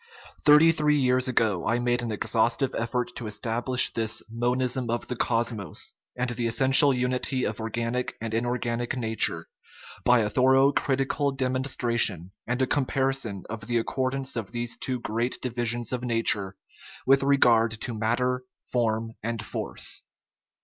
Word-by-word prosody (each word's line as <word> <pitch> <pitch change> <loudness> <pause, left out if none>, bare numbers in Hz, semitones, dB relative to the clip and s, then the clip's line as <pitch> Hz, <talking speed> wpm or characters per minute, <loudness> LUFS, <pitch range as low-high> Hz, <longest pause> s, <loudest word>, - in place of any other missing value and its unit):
Thirty 150 +2 +7
three 150 -2 +2
years 130 -2 +2
ago 110 -8 +1
I 120 - +2
made 120 0 0
an 120 -2 -3
exhaustive 115 +5 0
effort 120 +2 -2
to 115 - -5
establish 115 +4 +2
this 110 -1 -1
" - - -32
monism 125 0 0
of 120 +1 -2
the 125 - -3
cosmos 115 -7 -2
" - - -67
and 125 0 -1
the 120 -1 -2
es 115 - -2
sential 135 +1 +6
unity 125 +1 0
of 110 - -3
organic 115 +2 -3
and 110 -1 -5
inorganic 120 +1 -2
nature 110 -2 0 0.6
by 125 -1 +4
a 105 - 0
thorough, 130 +2 +4
critical 135 +1 0
demonstration, 125 - -1 0.2
and 125 +2 0
a - - +4
comparison 135 -6 -1
of 110 0 -7
the 120 -1 +1
accordance 130 +3 -2
of 110 -5 -4
these 120 -1 -2
two 125 +2 -3
great 115 +2 -2
divisions 120 -1 -2
of 125 -1 -3
nature 115 -5 +1 0.5
with 135 +1 +5
regard 120 -5 +4
to 120 - -3
matter, 125 +3 -1 0.3
form, 115 -2 0
and 115 0 -4
force. - - -2
120 Hz, 155 wpm, -26 LUFS, 115-130 Hz, 0.6 s, Thirty